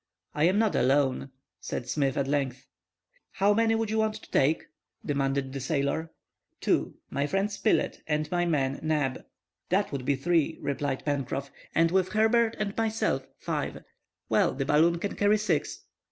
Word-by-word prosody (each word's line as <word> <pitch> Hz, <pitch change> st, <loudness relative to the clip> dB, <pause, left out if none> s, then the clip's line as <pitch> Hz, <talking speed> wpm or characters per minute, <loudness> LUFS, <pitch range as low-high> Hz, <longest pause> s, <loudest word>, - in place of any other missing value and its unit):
"I 150 Hz, +1 st, +2 dB
am 185 Hz, +4 st, +3 dB
not 220 Hz, -1 st, +2 dB
alone," 135 Hz, +1 st, +2 dB, 0.3 s
said 120 Hz, -, -5 dB
Smith 135 Hz, -1 st, 0 dB
at 140 Hz, -, 0 dB
length. 140 Hz, -3 st, -1 dB, 0.7 s
"How 200 Hz, +2 st, +3 dB
many 225 Hz, +1 st, +3 dB
would 225 Hz, -1 st, -1 dB
you 220 Hz, -, +1 dB
want 220 Hz, 0 st, +1 dB
to 215 Hz, -, -12 dB
take?" 150 Hz, +4 st, +2 dB, 0.4 s
demanded 135 Hz, -1 st, -1 dB
the 135 Hz, -, -3 dB
sailor. 140 Hz, +3 st, -1 dB, 0.5 s
"Two; -, -, 0 dB, 0.2 s
my 140 Hz, +1 st, 0 dB
friend 195 Hz, +5 st, 0 dB
Spilett, 200 Hz, -, 0 dB
and 155 Hz, 0 st, 0 dB
my 175 Hz, -1 st, +1 dB
man 140 Hz, -5 st, 0 dB
Neb." 150 Hz, -4 st, -1 dB, 0.5 s
"That 195 Hz, +3 st, +1 dB
would 140 Hz, -3 st, -3 dB
be 140 Hz, -, +2 dB
three," 165 Hz, +2 st, +1 dB
replied 140 Hz, -1 st, -2 dB
Pencroff; 140 Hz, -1 st, -2 dB, 0.2 s
"and, 165 Hz, 0 st, +4 dB
with 190 Hz, +1 st, +1 dB
Herbert 225 Hz, +1 st, +3 dB
and 210 Hz, -1 st, -2 dB
myself, 220 Hz, -12 st, 0 dB
five. -, -, -3 dB, 0.4 s
Well, -, -, +2 dB
the 135 Hz, 0 st, -2 dB
balloon 160 Hz, +4 st, +4 dB
can 200 Hz, +4 st, -3 dB
carry 205 Hz, +1 st, +3 dB
six?" 215 Hz, 0 st, -1 dB
155 Hz, 165 wpm, -28 LUFS, 140-205 Hz, 0.7 s, and